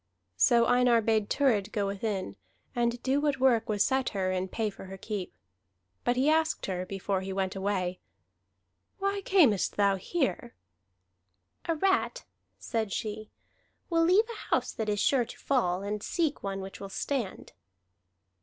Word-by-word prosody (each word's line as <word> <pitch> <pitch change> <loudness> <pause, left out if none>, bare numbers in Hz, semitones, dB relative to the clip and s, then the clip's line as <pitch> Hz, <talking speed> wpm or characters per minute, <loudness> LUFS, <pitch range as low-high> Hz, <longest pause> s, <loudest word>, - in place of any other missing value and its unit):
So 235 - +5
Einar 245 -1 +4
bade 220 -2 +1
Thurid 220 -8 +2
go 205 -2 0
within, 200 -1 -3 0.4
and 240 0 0
do 270 +2 +2
what 290 -2 0
work 250 -4 +3
was 205 -1 +2
set 265 -1 +1
her, 185 -1 0
in 185 0 -1
pay 215 +2 -2
for 195 - -11
her 190 +1 -8
keep. 200 - -5 0.7
But 245 - +2
he 260 +3 +2
asked 315 +1 +2
her 185 -1 -3
before 195 0 -2
he 190 0 -5
went 190 0 -2
away: 190 -2 -1 1.0
"Why 395 0 -1
camest 310 - +3
thou 200 -1 +3
here?" 250 - -2 1.1
"A 330 - 0
rat," 385 +4 +1 0.3
said 220 -4 -2
she, 215 +2 -4 0.6
"will 330 0 +3
leave 370 +6 +5
a 465 -2 -9
house - - +1
that 220 -1 -3
is 205 -1 0
sure 250 +2 +3
to 235 - -11
fall, 190 -9 0
and 205 +1 -3
seek 315 - -1
one 195 -1 -3
which 190 0 -8
will 195 - -7
stand." 235 0 -3
220 Hz, 160 wpm, -29 LUFS, 195-265 Hz, 1.1 s, So